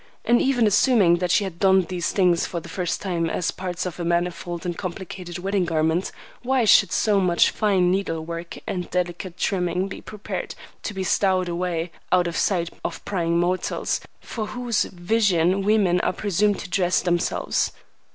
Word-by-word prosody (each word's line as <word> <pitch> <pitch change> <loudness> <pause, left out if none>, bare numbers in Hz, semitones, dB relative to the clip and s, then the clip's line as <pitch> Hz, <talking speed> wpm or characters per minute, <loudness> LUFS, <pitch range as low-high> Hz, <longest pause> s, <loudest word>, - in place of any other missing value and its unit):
And 240 0 +4
even 255 -4 +2
assuming 210 -4 +4
that 180 0 -1
she 195 +3 +3
donned 190 +1 +2
these 180 -2 -1
things 180 -4 +2
for 170 - -4
the 170 - -12
first 175 0 -3
time 170 -4 -1
as 165 - -1
parts 180 -1 -4
of 180 -1 -5
a - - -2
manifold 175 0 -2
and 175 -1 -2
complicated 180 -1 -6
wedding 195 +1 0
garment, 160 +2 0 0.3
why 255 -1 +1
should 200 -3 +6
so 210 -2 +2
much 180 -2 +3
fine 190 -4 +2
needle 165 -4 -1
work 170 +1 -6
and 180 -2 -4
delicate 180 0 -3
trimming 180 -1 0
be 195 - -8
prepared 210 -1 -6 0.3
to 205 - -5
be 190 - -2
stowed 185 -1 +2
away 170 -1 -2 0.2
out 180 -1 +4
of 170 -1 -3
sight 170 -3 0
of - - -5
prying 170 -4 0
mortals, 180 +1 -1 0.2
for 215 -3 -5
whose 240 -1 -1
vision 185 -1 +1
women 195 -3 +3
are - - 0
presumed 205 +1 +1
to - - -8
dress 180 -1 +2
themselves? 175 -1 0
180 Hz, 170 wpm, -23 LUFS, 175-195 Hz, 0.3 s, should